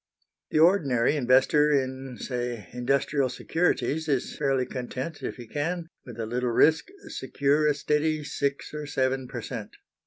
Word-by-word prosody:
The -, -, 0 dB
ordinary 155 Hz, -8 st, +4 dB
investor 135 Hz, +3 st, +4 dB
in, 130 Hz, -2 st, -1 dB
say, 120 Hz, -6 st, -4 dB
industrial 135 Hz, +2 st, +1 dB
securities 160 Hz, +2 st, 0 dB
is 135 Hz, -4 st, -1 dB
fairly 135 Hz, -3 st, +1 dB
content 130 Hz, +5 st, -5 dB
if -, -, -4 dB
he 120 Hz, -, -9 dB
can, 165 Hz, +6 st, -3 dB, 0.2 s
with 120 Hz, -2 st, -9 dB
a 115 Hz, -, -1 dB
little 125 Hz, +2 st, -1 dB
risk, 155 Hz, +7 st, +4 dB, 0.2 s
secure 140 Hz, +3 st, +1 dB
a 150 Hz, -, +3 dB
steady 150 Hz, +1 st, 0 dB
six 140 Hz, -1 st, -2 dB
or 150 Hz, -1 st, -5 dB
seven 130 Hz, -2 st, 0 dB
per 120 Hz, -2 st, -6 dB
cent. 115 Hz, -5 st, -6 dB
135 Hz, 150 wpm, -27 LUFS, 125-150 Hz, 0.2 s, ordinary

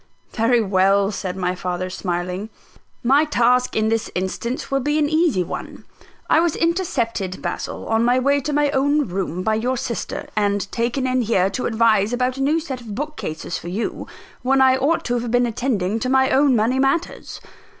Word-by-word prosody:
"Very 235 Hz, +1 st, +2 dB
well," 195 Hz, 0 st, +2 dB
said 190 Hz, -2 st, -4 dB
my 180 Hz, -1 st, -1 dB
father 180 Hz, 0 st, -3 dB
smiling; 180 Hz, +3 st, -3 dB, 0.5 s
"my 275 Hz, +5 st, +4 dB
task 250 Hz, -4 st, +2 dB
in 220 Hz, 0 st, +2 dB
this 225 Hz, -1 st, -1 dB
instance 235 Hz, -, -3 dB
will 275 Hz, -, +2 dB
be 295 Hz, +3 st, 0 dB
an 300 Hz, -1 st, +2 dB
easy 310 Hz, -, +2 dB
one. -, -, -7 dB, 0.4 s
I -, -, +4 dB
was 335 Hz, -2 st, +1 dB
intercepted, 240 Hz, -, -1 dB
Basil, -, -, -4 dB
on 225 Hz, +1 st, +2 dB
my 245 Hz, +1 st, +3 dB
way 280 Hz, +2 st, +2 dB
to 300 Hz, -, -3 dB
my 290 Hz, 0 st, +2 dB
own 285 Hz, +2 st, +2 dB
room 180 Hz, -1 st, -3 dB
by 220 Hz, -, +1 dB
your 245 Hz, +4 st, 0 dB
sister, 235 Hz, -1 st, -4 dB
and 205 Hz, -1 st, 0 dB
taken 240 Hz, +3 st, -1 dB
in 255 Hz, 0 st, +1 dB
here 195 Hz, -4 st, +1 dB
to 250 Hz, -, -2 dB
advise 220 Hz, -2 st, +2 dB
about 250 Hz, +1 st, 0 dB
a -, -, -3 dB
new 300 Hz, +4 st, +2 dB
set 270 Hz, -6 st, -6 dB
of 215 Hz, -4 st, -8 dB
bookcases 260 Hz, -, -5 dB
for -, -, -10 dB
you, 195 Hz, +6 st, -4 dB, 0.3 s
when 265 Hz, +2 st, +2 dB
I 260 Hz, -1 st, +5 dB
ought 285 Hz, +6 st, 0 dB
to 245 Hz, 0 st, 0 dB
have 235 Hz, 0 st, -4 dB
been 245 Hz, +1 st, +3 dB
attending 225 Hz, -4 st, -1 dB
to 255 Hz, -, -2 dB
my 265 Hz, 0 st, +3 dB
own 275 Hz, -1 st, +4 dB
money 235 Hz, +4 st, +1 dB
matters. 275 Hz, +6 st, -1 dB
240 Hz, 190 wpm, -21 LUFS, 200-270 Hz, 0.5 s, I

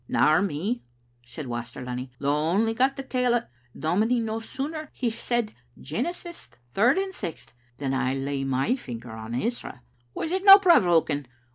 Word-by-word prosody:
"Nor 155 Hz, +4 st, +4 dB
me," 200 Hz, +6 st, -2 dB, 0.4 s
said 125 Hz, +5 st, -8 dB
Waster 120 Hz, 0 st, -5 dB
Lunny, 125 Hz, +1 st, -5 dB
"though 140 Hz, +2 st, 0 dB
I 150 Hz, +2 st, 0 dB
only 225 Hz, +2 st, +2 dB
got 260 Hz, +4 st, +2 dB
the 270 Hz, -, -5 dB
tail 250 Hz, -2 st, +1 dB
o't. 235 Hz, -, +1 dB, 0.3 s
Dominie, 215 Hz, +10 st, +1 dB
no 225 Hz, -1 st, -2 dB
sooner 275 Hz, +7 st, -5 dB
had -, -, -22 dB
he 240 Hz, -3 st, -1 dB
said 235 Hz, -1 st, -2 dB, 0.3 s
Genesis 340 Hz, -, -5 dB, 0.2 s
third 240 Hz, -, +4 dB
and 385 Hz, 0 st, -1 dB
sixth, 135 Hz, -, -7 dB, 0.2 s
than 135 Hz, -2 st, -2 dB
I 130 Hz, 0 st, 0 dB
laid 135 Hz, 0 st, -2 dB
my 135 Hz, -, +1 dB
finger 120 Hz, -, -8 dB
on 110 Hz, +1 st, -6 dB
Ezra. 220 Hz, -, -3 dB, 0.3 s
Was 325 Hz, -, -3 dB
it 375 Hz, +1 st, -1 dB
no 390 Hz, -1 st, +11 dB
provoking? 175 Hz, -, +3 dB
195 Hz, 170 wpm, -26 LUFS, -, 0.4 s, no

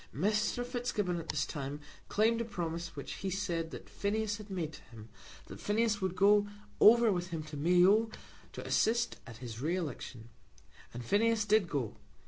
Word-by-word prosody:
Mr. 210 Hz, -, 0 dB
Fitzgibbon 235 Hz, -8 st, -2 dB
at 165 Hz, -, -9 dB
this -, -, 0 dB
time 145 Hz, -1 st, -5 dB, 0.3 s
claimed 225 Hz, +2 st, +2 dB
a -, -, 0 dB
promise 170 Hz, -6 st, -4 dB
which 140 Hz, -, -6 dB
he 195 Hz, -, -3 dB
said 175 Hz, -4 st, -2 dB
that -, -, -9 dB
Phineas 205 Hz, 0 st, -1 dB
had 210 Hz, -1 st, -11 dB
made 170 Hz, -5 st, -3 dB
to -, -, -11 dB
him, 115 Hz, -2 st, -13 dB, 0.4 s
that -, -, -10 dB
Phineas 215 Hz, 0 st, +1 dB
would 190 Hz, -1 st, -1 dB
go 205 Hz, +2 st, +5 dB, 0.3 s
over 235 Hz, 0 st, +7 dB
with 175 Hz, -1 st, -1 dB
him 165 Hz, -3 st, -4 dB
to 150 Hz, 0 st, -9 dB
Mayo 180 Hz, +8 st, +4 dB, 0.4 s
to -, -, -7 dB
assist 235 Hz, +2 st, +1 dB
at 115 Hz, -, -10 dB
his 120 Hz, -2 st, -7 dB
re 165 Hz, +5 st, 0 dB
election. 125 Hz, -8 st, -5 dB, 0.6 s
And 120 Hz, 0 st, -7 dB
Phineas 220 Hz, -, +2 dB
did 210 Hz, -4 st, +3 dB
go. 130 Hz, -7 st, -2 dB
190 Hz, 175 wpm, -32 LUFS, 155-215 Hz, 0.6 s, over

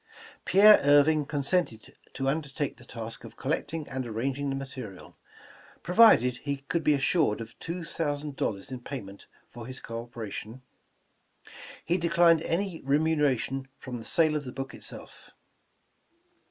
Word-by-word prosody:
Pierre 210 Hz, +2 st, +8 dB
Irving 145 Hz, +1 st, +4 dB
consented 145 Hz, -, -1 dB, 0.2 s
to 135 Hz, -, -3 dB
undertake 145 Hz, 0 st, -2 dB
the 120 Hz, -, -15 dB
task 115 Hz, -1 st, -8 dB
of -, -, -12 dB
col -, -, -3 dB
lecting 160 Hz, -2 st, -2 dB
and 130 Hz, 0 st, -3 dB
arranging 135 Hz, +5 st, -2 dB
material, 130 Hz, -8 st, -8 dB, 0.7 s
provided 175 Hz, -, +6 dB
he 140 Hz, +1 st, -3 dB
could 150 Hz, +4 st, -3 dB
be 150 Hz, -, +4 dB
assured 140 Hz, -5 st, +1 dB
of 115 Hz, 0 st, -9 dB
two 170 Hz, +1 st, -5 dB
thousand 145 Hz, -3 st, -3 dB
dollars 100 Hz, -1 st, -3 dB
in 130 Hz, -, -5 dB
payment 110 Hz, -7 st, -8 dB, 0.2 s
for 120 Hz, -1 st, -9 dB
his 130 Hz, 0 st, -6 dB
co 115 Hz, 0 st, -6 dB
operation. 115 Hz, +1 st, -8 dB, 1.2 s
He 175 Hz, +2 st, +1 dB
declined 170 Hz, -1 st, +4 dB
any 175 Hz, 0 st, -2 dB
remuneration 135 Hz, -3 st, +1 dB
from 125 Hz, -2 st, -7 dB
the -, -, -9 dB
sale 155 Hz, +5 st, +2 dB
of 150 Hz, -, -2 dB
the 125 Hz, -, -7 dB
book 135 Hz, +1 st, -6 dB
itself. -, -, -10 dB
140 Hz, 140 wpm, -28 LUFS, 120-160 Hz, 1.2 s, Pierre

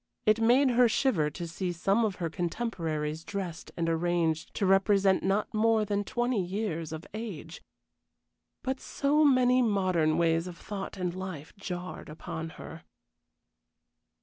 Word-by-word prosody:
It 215 Hz, +1 st, +4 dB
made 255 Hz, +4 st, +5 dB
her 245 Hz, 0 st, +5 dB
shiver 210 Hz, -, +2 dB
to 170 Hz, +3 st, -6 dB
see 180 Hz, +2 st, -3 dB
some 195 Hz, +6 st, +1 dB
of 205 Hz, -3 st, -1 dB
her 170 Hz, -, -2 dB
contemporaries 165 Hz, -4 st, -3 dB
dressed 185 Hz, -5 st, -5 dB
and 165 Hz, -1 st, 0 dB
arranged 165 Hz, -1 st, 0 dB
to 200 Hz, -, 0 dB
represent 195 Hz, 0 st, +4 dB
not 195 Hz, +3 st, 0 dB
more 220 Hz, 0 st, +3 dB
than 205 Hz, 0 st, 0 dB
twenty 240 Hz, 0 st, 0 dB
years 180 Hz, -4 st, -3 dB
of 160 Hz, +1 st, -6 dB
age. 200 Hz, -7 st, -6 dB, 1.0 s
But 265 Hz, 0 st, -2 dB
so 295 Hz, +2 st, +1 dB
many 255 Hz, -3 st, +5 dB
modern 185 Hz, -8 st, +2 dB
ways 165 Hz, 0 st, +2 dB
of 175 Hz, -2 st, -8 dB
thought 195 Hz, -1 st, -6 dB
and 180 Hz, -2 st, -2 dB
life 185 Hz, -5 st, -7 dB
jarred 180 Hz, -4 st, -6 dB
upon 160 Hz, +1 st, -6 dB
her! 160 Hz, -, -9 dB
190 Hz, 145 wpm, -29 LUFS, 165-220 Hz, 1.0 s, made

